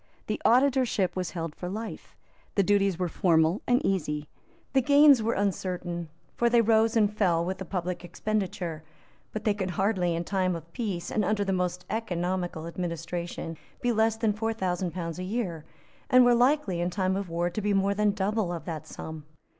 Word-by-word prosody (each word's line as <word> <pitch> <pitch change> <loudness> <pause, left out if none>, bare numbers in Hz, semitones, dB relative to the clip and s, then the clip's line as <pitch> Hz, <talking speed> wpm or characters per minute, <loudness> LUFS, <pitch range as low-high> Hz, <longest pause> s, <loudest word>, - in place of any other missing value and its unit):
The - - -3
Auditorship 250 -6 +3
was 180 -2 -2
held 165 -3 -4
for 180 - -6
life. 220 +4 -6 0.4
The 200 - +4
duties 195 -2 +2
were 180 0 0
formal 165 +1 +2
and 245 +4 +3
easy. 150 -6 -1 0.5
The 265 - +4
gains 285 -1 +6
were 225 +2 0
uncertain; 180 -4 -2 0.3
for 240 - +2
they 235 0 +4
rose 225 0 +3
and 210 -1 +2
fell 170 -5 +2
with 185 +1 -3
the 190 - -5
public 180 -1 -3
expenditure; 180 -3 -3 0.5
but 215 - -5
they 210 - +3
could 190 -2 -3
hardly, 180 -2 +1
in 170 - -2
time 185 -1 0
of 165 0 -10
peace, 200 -8 -3
and 215 - +1
under 205 -1 +1
the 195 - 0
most 180 -1 -1
economical 180 -5 -2
administration, 170 -1 -4 0.2
be 245 - +1
less 220 0 +2
than 220 -2 +1
four 225 +2 -1
thousand 185 -4 -1
pounds 170 0 -5
a - - -3
year, 185 -6 -3 0.4
and 255 0 +7
were 245 - +6
likely, 245 - +2
in 175 - 0
time 185 0 0
of 195 -2 -3
war, 170 +1 -1
to 215 - -3
be 210 0 0
more 195 0 +2
than 210 +1 +2
double 205 -1 0
of 165 -3 -5
that 160 -3 -5
sum. 160 -1 -8
190 Hz, 190 wpm, -28 LUFS, 175-215 Hz, 0.5 s, and